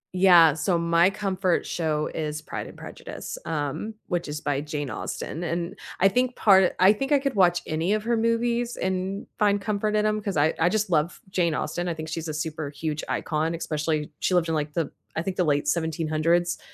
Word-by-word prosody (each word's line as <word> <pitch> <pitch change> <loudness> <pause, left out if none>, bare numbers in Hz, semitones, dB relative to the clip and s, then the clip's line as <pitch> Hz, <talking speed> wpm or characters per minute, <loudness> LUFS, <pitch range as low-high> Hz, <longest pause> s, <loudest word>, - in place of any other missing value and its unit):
Yeah, 175 -5 +7
so 170 +3 0
my 170 +2 +4
comfort 190 -3 0
show 155 -3 -1
is 155 -1 -3
Pride - - -6
and - - -12
Prejudice, - - -8
um, 160 +7 -3
which 175 -3 -1
is 150 +1 -5
by 145 -2 -1
Jane 145 -3 -4
Austen, 165 - -5
and 170 +2 -3 0.3
I 195 - +7
think 250 +5 +1
part 190 -3 +5
I 190 +3 +7
think 270 +7 -4
I 290 - +6
could 275 -1 -1
watch 175 -3 +3
any 165 +6 0
of 215 0 -1
her 235 0 +1
movies 235 +1 0
and 190 +1 -2
find 205 -1 +3
comfort 210 +1 -1
in 210 0 +2
'em 215 0 +1
'cause 200 -6 -3
I 150 +2 +3
I 165 - +4
just 210 -1 0
love 160 +2 +1
Jane 170 -5 +1
Austen, 175 0 -2
I 170 - -2
think 155 0 -6
she's 165 0 -4
a 155 - -3
super 155 -1 -3
huge 155 +1 -4
icon, 160 +2 -1
especially 155 -1 -2
she 185 - +1
lived 170 -2 +2
in, - - 0
like, 150 -1 -2
the, 165 -3 -1 0.2
I 160 - -1
think, 190 0 -3
the 180 - +2
late 145 -1 +1
1700s 160 +2 +1
170 Hz, 210 wpm, -25 LUFS, 155-200 Hz, 0.3 s, Yeah